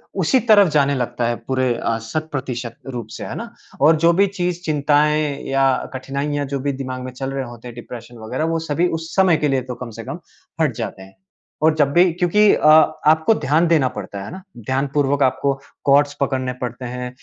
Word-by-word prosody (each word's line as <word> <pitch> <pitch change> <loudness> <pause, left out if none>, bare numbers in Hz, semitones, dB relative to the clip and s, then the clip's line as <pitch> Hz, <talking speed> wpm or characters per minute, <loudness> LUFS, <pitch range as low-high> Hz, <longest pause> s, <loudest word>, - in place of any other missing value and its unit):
उसी 195 +7 +2
तरफ 205 -3 +7
जाने 140 -1 +3
लगता 120 -2 -2
है 120 - 0
पूरे 130 -2 +1
अ, 115 - -1
शत-प्रतिशत 130 -3 -4
रूप 120 -4 -5
से, - - -7
है - - -6
ना? - - -7 0.3
और 155 +3 +6
जो 165 +2 +4
भी 200 +3 +3
चीज़, 180 -2 -3
चिंताएँ 150 -1 +1
या 135 0 +3 0.2
कठिनाइयाँ 140 +2 -3
जो 140 0 -3
भी 140 +2 -1
दिमाग 130 -1 -5
में 130 - -6
चल 135 +1 -5
रहे 135 -1 -3
होते 120 0 -11
हैं 120 - -9
डिप्रेशन 120 0 -10
वगैरह 130 +7 -2
वो - - 0
सभी 170 +5 +2
उस 165 +1 -9
समय 185 -4 +4
के 150 - 0
लिए 135 -2 +1
तो - - -5
कम 125 0 -7
से - - -5
कम - - -6 0.4
हट - - +1
जाते - - -5
हैं। 95 0 -16 0.5
और 160 0 +5
जब 145 -3 +2
भी 175 +1 +5
क्योंकि 180 +5 +4
अ, - - -1 0.4
आपको 160 +7 +4
ध्यान 160 -1 +2
देना 155 -6 +3
पड़ता 100 -2 -7
है। 100 - -7
है - - -8
ना? 190 - -8 0.2
ध्यानपूर्वक 135 +4 0
आपको 130 +2 +1 0.3
कॉर्ड्स 145 +1 +4
पकड़ने 130 -2 -1
पड़ते 125 +1 -5
हैं 125 0 -5
140 Hz, 210 wpm, -20 LUFS, 125-155 Hz, 0.5 s, तरफ